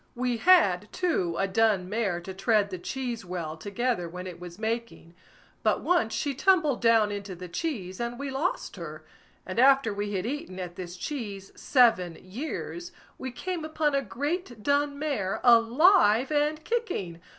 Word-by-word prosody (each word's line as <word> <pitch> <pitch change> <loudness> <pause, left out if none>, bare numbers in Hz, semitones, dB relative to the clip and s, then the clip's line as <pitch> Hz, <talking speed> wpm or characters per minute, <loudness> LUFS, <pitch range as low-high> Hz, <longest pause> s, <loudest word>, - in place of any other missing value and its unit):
We 245 -1 -1
had, 215 - +4
too 310 - 0
a 195 - +1
dun 200 -2 +2
mare 200 -4 -1
to 190 +2 -7
tread 205 +1 +1
the 185 - -5
cheese 240 +2 -4
well 175 -4 -5
together 200 +2 -2
when 180 +2 -7
it 180 -2 -8
was 175 0 -9
making; 225 -6 -4 0.5
but - - +1
once 340 -11 +2
she 285 - -1
tumbled 310 -3 +2
down 225 -3 +4
into 200 -2 -5
the 180 +1 -8
cheese, 185 - -4
and 235 0 -3
we 280 0 -4
lost 295 +8 -2
her; - - -8 0.4
and - - -3
after 265 -3 +5
we 205 0 -3
had 190 0 -2
eaten 280 - -5
at 175 -1 -6
this 180 0 -7
cheese 200 -6 -5
seven 220 - +3
years, 310 - -6 0.3
we 260 - -4
came 350 +6 -4
upon 310 -1 0
a 275 - +2
great 260 - -4
dun 285 +2 +1
mare, 265 -11 -2
alive 245 - +5
and 300 +1 +1
kicking. 335 - -3
230 Hz, 165 wpm, -27 LUFS, 190-285 Hz, 0.5 s, after